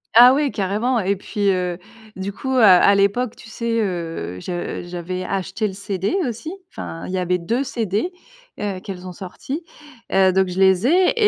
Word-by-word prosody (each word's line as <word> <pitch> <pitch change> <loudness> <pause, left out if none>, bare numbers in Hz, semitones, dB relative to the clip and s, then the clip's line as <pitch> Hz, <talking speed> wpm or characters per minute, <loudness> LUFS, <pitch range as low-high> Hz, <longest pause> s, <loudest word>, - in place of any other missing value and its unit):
Ah 245 +2 +10
ouais 290 +1 +2
carrément 215 +4 0
et 200 0 +1
puis, 200 +1 0
heu, 180 -2 -1 0.4
du 190 +1 -4
coup 265 - -5
à 235 - +7
à 200 +3 +5
l'époque 205 +5 +1
tu - - -14
sais, 230 0 -1
heu, 165 - -3
je 175 - -4
j'avais 180 +1 -4
acheté 195 +3 -2
le 195 - -6
CD 195 - -2
aussi, 240 +7 -5 0.2
enfin 165 - -7
il 185 - -6
y 185 - 0
avait 180 0 +1
2 230 +10 -1
CD, 230 - -1 0.5
heu, 200 -3 -2
qu'elles 185 -1 -8
ont - - -6
sortis. 260 - -6 0.5
Heu, 190 -1 +4
donc 190 0 +3
je 180 +1 -4
les 190 +3 +4
ai 360 +5 +4
195 Hz, 185 wpm, -21 LUFS, 185-230 Hz, 0.5 s, Ah